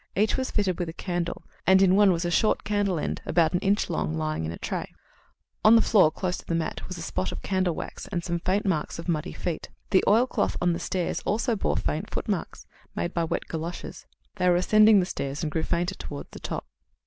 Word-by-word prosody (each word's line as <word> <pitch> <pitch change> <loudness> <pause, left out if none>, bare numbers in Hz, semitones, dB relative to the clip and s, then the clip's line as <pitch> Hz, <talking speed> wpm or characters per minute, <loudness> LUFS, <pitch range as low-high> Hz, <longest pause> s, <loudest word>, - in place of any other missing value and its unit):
Each 215 +3 +2
was 260 0 -2
fitted 190 -4 0
with 175 -2 -2
a - - -6
candle, 175 -1 -3 0.2
and 190 0 +7
in 190 -1 +5
one 205 -1 +6
was 175 0 0
a 175 - 0
short 215 +5 +2
candle 205 -3 0
end, - - -3
about 165 -2 +2
an 175 - +2
inch 200 +3 +1
long, 75 +1 -2
lying 80 0 -2
in - - -3
the 85 - -6
tray. - - -4 0.7
On 220 +2 +8
the 225 - +6
floor, 195 -8 +5
close 180 +3 -3
to - - -11
the 170 - 0
mat, 165 -1 -3
was 185 - -6
a 165 - -6
spot 95 - -2
of - - -7
candle 185 -3 0
wax - - -7
and 180 -4 -3
some 170 -1 -2
faint 190 +5 0
marks 165 -6 -1
of 165 - -7
muddy 155 -4 -1
feet. 175 -3 -4 0.2
The 190 - +5
oil 230 +4 +5
cloth - - -1
on 175 -1 +2
the 170 - -3
stairs 180 0 -2
also 230 +3 0
bore 195 - 0
faint - - -2
footmarks, - - -3 0.3
made 175 - -2
by 170 -1 0
wet - - -2
goloshes. 165 +2 -6 0.3
They 180 -1 +3
were 175 - +5
ascending 215 +3 +6
the - - 0
stairs, 140 -4 -4
and 155 - -2
grew 160 - 0
fainter 175 +3 -1
towards 145 -5 -8
the - - -9
top. - - -4
180 Hz, 235 wpm, -26 LUFS, 165-195 Hz, 0.7 s, On